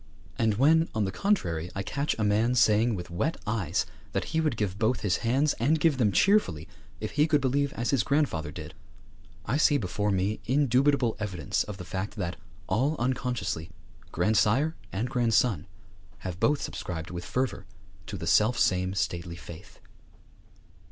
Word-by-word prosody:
And, 110 -2 +2
when, 160 +7 +4
on 110 -2 +1
the 95 - -2
contrary, 90 - 0
I 95 - -2
catch 140 +8 -1
a 110 - 0
man 110 +4 +2
saying 110 0 +4
with 90 -1 -7
wet 140 - -1
eyes 100 -6 0 0.3
that - - 0
he 160 - +2
would 150 -8 0
give 100 -2 -2
both 115 +2 +1
his 95 -5 +1
hands, 135 +6 +1
and 150 +7 +2
give 150 -4 +2
them 105 -4 +3
cheerfully, 95 - +2 0.3
if - - -4
he 150 +2 +3
could 150 -2 +3
believe 140 +1 +1
as 120 +1 -1
his 135 -4 +3
grandfather 130 - 0
did, - - -8 0.7
I 125 +7 0
see 150 -1 +4
before 105 -2 -1
me 100 +2 0
indubitable 135 -1 +2
evidence 95 -8 -1
of 105 -2 -7
the 90 - -8
fact 95 +3 -4
that, 90 -4 -3 0.3
all 130 - +1
unconsciously, 120 -9 -2 0.4
grandsire 115 +9 +2 0.2
and 105 +6 -2
grandson 115 - +1 0.6
have 90 -1 -4
both 145 +5 +2
subscribed 80 -2 -5
with 85 -1 -5
fervour 125 -4 -2 0.4
to - - -5
the - - -6
selfsame 95 -4 +2
stately 85 -2 -2
faith. 85 -1 -12
110 Hz, 165 wpm, -28 LUFS, 95-135 Hz, 0.7 s, when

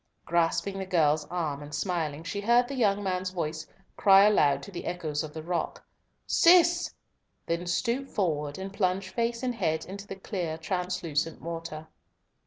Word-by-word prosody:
Grasping 170 +4 +1
the 190 - -3
girl's 155 -4 +2
arm 155 -5 -3
and 145 0 -7
smiling, 160 -2 -2
she 200 +5 -4
heard 240 +3 +4
the 280 - -5
young 205 -6 +2
man's 185 -1 -1
voice 160 -3 -4 0.3
cry 195 0 +7
aloud 145 -9 +3
to 200 - -9
the 175 - -6
echoes 155 -4 -2
of 155 - -7
the 160 0 -7
rock, 175 +1 -3 0.4
"Cis!" 345 0 +5 0.5
then 170 +1 -2
stoop 245 +9 -1
forward 150 -7 -1
and 195 +1 -6
plunge 190 -1 0
face 235 +2 -1
and 250 -1 0
head 160 -9 -1
into 200 +2 -8
the 195 - -6
clear 180 -5 -4
translucent 170 -3 -2
water. 165 -2 -6
180 Hz, 165 wpm, -28 LUFS, 160-200 Hz, 0.5 s, cry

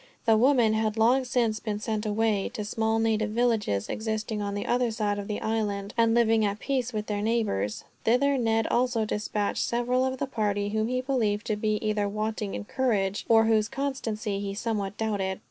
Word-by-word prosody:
The 225 -2 +5
women 240 -1 +4
had 220 0 0
long 250 +4 +4
since 230 -3 0
been 215 -2 -3
sent 215 0 -3
away, 210 -1 +1
to 210 - -3
small 220 +1 0
native 220 -1 +1
villages 215 - 0
existing 220 -1 -3
on 200 0 -3
the 205 - -3
other 245 0 +1
side 210 -2 -1
of 200 - -6
the 210 - -3
island, 205 -2 -2
and 230 -1 +3
living 225 -2 +4
at 200 -1 0
peace 255 0 -1
with 210 -2 -3
their 205 -1 -2
neighbors 210 - -1 0.2
Thither 275 +5 +3
Ned 225 -1 +1
also 240 -2 +1
dispatched 210 -1 -1
several 245 +2 +1
of 260 0 -1
the 280 - -1
party 205 -5 -1
whom 220 +1 0
he 255 +1 -1
believed 230 -6 0
to 215 - 0
be 215 0 0
either 210 -1 0
wanting 215 -1 -3
in - - -4
courage, 205 -6 0
or 225 -1 +6
whose 220 -1 +2
constancy 230 -7 -3
he 200 -1 -4
somewhat 205 -3 -2
doubted. 200 -4 -1
220 Hz, 195 wpm, -27 LUFS, 210-235 Hz, 0.2 s, or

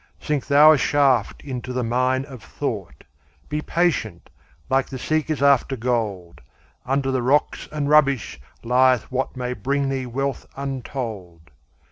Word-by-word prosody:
Sink 150 -3 -2
thou 150 +2 +7
a 155 - +4
shaft 135 -6 +2
into 130 -2 -5
the 125 0 -1
mine 130 +3 0
of 130 -5 -11
thought; - - -5 0.5
Be 150 0 -2
patient, 175 +1 -1 0.4
like 135 +1 +1
the 135 - -6
seekers 155 +1 -1
after 140 -1 +3
gold; 110 -8 -3 0.5
Under 135 0 0
the 130 -1 0
rocks 135 +5 +1
and 150 -2 -2
rubbish 140 - +2 0.2
lieth 125 +1 +3
what 130 0 -2
May 125 0 -3
bring 140 +5 -1
thee 135 -2 -3
wealth 135 +3 -3
untold. 115 - -6
130 Hz, 140 wpm, -22 LUFS, 125-140 Hz, 0.5 s, thou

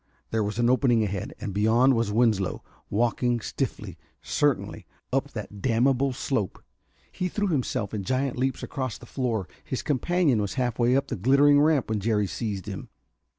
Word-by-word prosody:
There 110 -1 +1
was 105 +1 -3
an 120 0 +3
opening 125 -2 +3
ahead, 100 -2 -4
and 100 - -4
beyond 115 +6 +4
was 115 -3 0
Winslow, 105 -4 +1 0.3
walking 120 +2 +1
stiffly, - - -4 0.2
certainly, - - -1 0.3
up - - 0
that 105 -1 -7
damnable 130 +3 +2
slope. 120 - -2 0.5
He 180 - -2
threw 205 +2 -1
himself 125 - -1
in 105 -2 -3
giant 130 +4 0
leaps 130 +1 -1
across 130 -4 -4
the - - -13
floor. 115 -7 -2 0.2
His 130 - -4
companion 145 -3 +2
was 100 - -3
half 125 -3 -1
way 120 +1 +4
up 135 - +2
the - - -2
glittering 140 +7 +5
ramp 150 -3 +3
when 110 - 0
Jerry 105 0 +1
seized 100 -2 -4
him. - - -7
120 Hz, 170 wpm, -26 LUFS, 105-135 Hz, 0.5 s, glittering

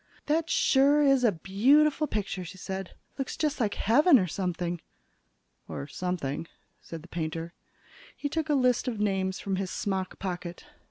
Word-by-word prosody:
"That 320 +2 +1
sure 285 +1 +4
is 275 -2 +4
a 230 - +5
beautiful 275 - +3
picture," 200 -5 -3
she 180 +2 -9
said. 190 0 -6 0.2
"Looks 270 - -3
just 300 -2 -1
like 215 -4 0
heaven 280 - +5
or 190 - +2
something." 175 -1 -3 0.9
"Or - - -5
something," 165 -2 -3 0.3
said 165 -2 -9
the - - -13
painter. 165 0 -4 0.6
He 290 - -2
took 315 +2 -2
a 295 - +3
list 250 -2 +2
of 230 -4 -2
names 190 -2 0
from 195 -1 -2
his 190 -1 -2
smock 190 -2 -3
pocket. 175 -2 -5
195 Hz, 160 wpm, -28 LUFS, 180-275 Hz, 0.9 s, a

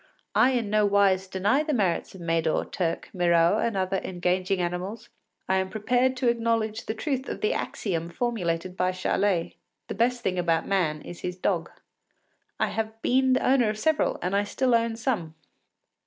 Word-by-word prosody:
I 260 - +4
in 230 -5 -1
no 215 0 +3
wise 195 -2 +3
deny 200 +9 +1
the 305 -2 -1
merits 190 -4 0
of 185 - -10
Médor, 165 -1 0
Turk, 170 -2 -2
Miraut, 175 +2 +3
and 230 -4 -1
other 190 0 0
engaging 185 +1 -1
animals, 185 +7 -4 0.4
and 190 - +2
I - - +3
am 190 0 -2
prepared 245 +6 +1
to 255 -1 0
acknowledge 230 -2 0
the 220 - -2
truth 265 +1 -2
of - - -5
the 430 +3 +1
axiom 170 -5 -3
formulated 180 -4 -2
by 185 0 0
Charlet, 185 -1 0 0.3
“The - - -2
best 240 +1 0
thing 185 -1 0
about 165 -2 +1
man 165 -6 0
is 175 - -9
his 180 0 -4
dog.” - - -1 0.9
I - - +1
have 220 0 -4
been 260 +1 +3
the - - +1
owner 255 -4 +4
of 210 - -3
several, 310 +7 +1
and 185 +2 0
I 200 - +3
still 250 +5 0
own 230 -1 +2
some. 215 -9 -2
200 Hz, 185 wpm, -26 LUFS, 180-235 Hz, 0.9 s, I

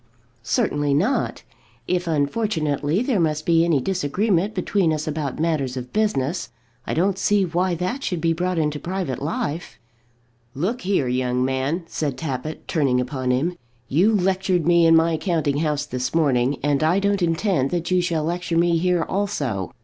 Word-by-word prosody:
"Certainly 145 +3 0
not. 210 - 0 0.4
If, 180 -1 0
unfortunately, 155 - 0
there 250 -6 +1
must 155 -2 0
be 165 -1 +4
any 165 -4 +2
disagreement 190 - 0
between 185 -2 +1
us 155 +1 -2
about 150 -3 -3
matters 150 -5 -1
of 125 0 -7
business, 185 - 0 0.4
I - - -1
don't 190 +4 +1
see 205 -2 +2
why 175 +1 0
that 185 - -3
should 180 - -2
be 165 0 +1
brought 180 +2 -1
into 150 -2 0
private 175 -9 -3
life." 155 +2 -3 0.8
"Look 195 - -2
here, 185 -8 +1
young 125 0 0
man," 135 +6 -1
said 145 -5 -3
Tappitt, 150 +1 -5
turning 135 -6 +1
upon 130 0 -2
him. 145 +8 +1 0.3
"You 190 +10 +3
lectured 185 -3 +1
me 170 -1 +5
in 165 - +6
my 165 0 +3
counting 155 -6 0
house 150 -1 0
this 125 0 -3
morning, 135 -4 +2
and 145 0 +1
I 165 +4 +3
don't 200 0 +1
intend 165 -4 +1
that 175 +2 -2
you 180 0 +3
shall 165 -3 -1
lecture 170 +1 -2
me 170 0 +3
here 180 -1 +1
also. 145 - -2
165 Hz, 165 wpm, -22 LUFS, 145-180 Hz, 0.8 s, in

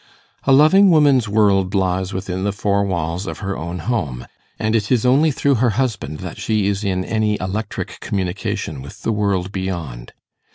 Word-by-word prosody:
A 135 - +3
loving 155 +9 +6
woman's 140 - +4
world 100 -2 +2
lies 95 0 0
within 95 -1 -4
the 100 - +1
four 100 0 0
walls 90 0 -2
of - - -5
her 100 -1 -4
own 85 +2 -5
home; 80 - -3 0.3
and 110 +1 0
it 105 -3 0
is 125 -2 +2
only 140 +6 +4
through 140 0 +1
her 125 - +4
husband 105 - -2
that - - -7
she 110 -3 0
is 100 0 -1
in 95 -2 -1
any 110 -1 0
electric 100 +3 -4
communication 90 -6 -3
with 70 - -12
the - - 0
world 100 -3 0
beyond. 85 -11 -5
100 Hz, 175 wpm, -20 LUFS, 90-110 Hz, 0.3 s, loving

